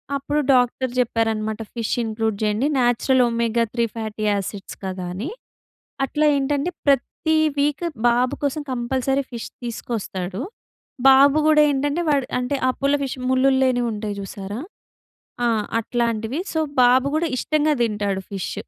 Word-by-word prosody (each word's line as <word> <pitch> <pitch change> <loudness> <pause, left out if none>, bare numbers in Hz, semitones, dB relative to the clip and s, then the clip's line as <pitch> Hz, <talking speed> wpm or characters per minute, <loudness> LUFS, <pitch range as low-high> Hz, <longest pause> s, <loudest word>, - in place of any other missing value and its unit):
అప్పుడు 280 +2 -1
డాక్టర్ 250 0 +2
చెప్పారనమాట, 225 -2 0
fish 230 -2 -2
include 220 -1 -1
చేయండి. 215 +5 +1
Natural 250 +1 +3
omega 235 0 +1
three 235 -1 +1
fatty 220 -1 -5
acids 200 -1 -3
కదా! 185 -1 -4
అని. 210 - -4 0.8
అట్లా 300 +3 0
ఏంటంటే, 280 +4 0 0.2
ప్రతి 285 +4 +1 0.2
వీక్ 295 +4 +1 0.2
బాబు 245 +1 +2
కోసం 285 +2 -1
కంపల్సరీ 260 +2 0
ఫిష్ 235 -1 -5 0.2
తీసుకొస్తాడు. 200 -5 -4 0.7
బాబు 275 +2 +7
కూడా 305 -1 +6
ఏంటంటే, 290 +4 0
వాడు 275 -3 +2
అంటే 250 +3 -1
అపోలో 280 +2 0
ఫిష్ 265 - -4
ముల్లులు 265 +1 +3
లేనివి 245 -2 +1
ఉంటాయి 210 -1 -4
చూసారా! 200 +3 -6 0.9
ఆ! - - +3 0.3
అట్లాంటివి. 230 +3 -1
సో, 320 - +1 0.2
బాబు 250 +2 +5
కూడా 330 +1 +1
ఇష్టంగా 305 +3 +1
తింటాడు 205 -4 -1
ఫిష్ 195 -2 -4
245 Hz, 130 wpm, -22 LUFS, 220-275 Hz, 0.9 s, బాబు